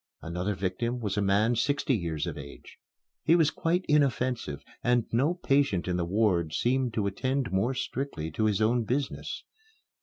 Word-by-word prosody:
Another 90 +5 -2
victim 100 +7 -2
was 105 -4 -2
a 105 - +1
man 100 +4 +3
sixty 140 +3 +1
years 85 -6 -2
of - - -4
age. 70 0 -11 0.4
He 165 - +5
was 160 -3 +4
quite 175 +3 0
inoffensive, 130 - +1 0.2
and 120 -1 +3
no 140 +9 +2
patient 135 - +1
in 90 - 0
the 85 - 0
ward 90 -4 +1
seemed 125 +1 +1
to 105 - 0
attend 130 +3 -1
more 105 +8 +1
strictly 130 - -3
to 110 +8 0
his 105 0 +1
own 120 +2 +2
business. 130 +5 -3
115 Hz, 170 wpm, -28 LUFS, 95-135 Hz, 0.4 s, He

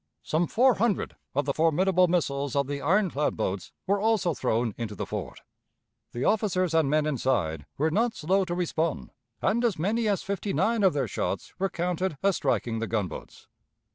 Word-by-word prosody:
Some 165 +2 0
four 255 +3 +4
hundred 215 -1 0 0.2
of 145 - +1
the 140 - 0
formidable 180 +4 +3
missiles 140 -6 0
of 140 0 +2
the 140 +1 -4
ironclad 170 -3 +1
boats 95 -4 -3
were 200 +2 +1
also 210 -5 +2
thrown 115 -3 0
into 110 -3 -5
the - - -4
fort. - - -6 0.7
The 120 - -3
officers 185 -5 +1
and 160 -4 +3
men 150 +1 +2
inside 115 - -1
were 155 +3 +1
not 225 +6 +1
slow 190 +5 +1
to 175 -1 -3
respond, 165 -3 -1 0.3
and 235 +3 +2
as 230 -7 +1
many 215 +8 0
as 200 -2 0
fifty 200 0 -3
nine 230 -1 +1
of 190 -3 +4
their 135 -4 0
shots - - -3
were 195 +1 +1
counted 180 -1 -2
as 200 -2 +3
striking 120 -4 0
the 115 - -2
gunboats. 105 -5 -4
165 Hz, 180 wpm, -27 LUFS, 140-195 Hz, 0.7 s, four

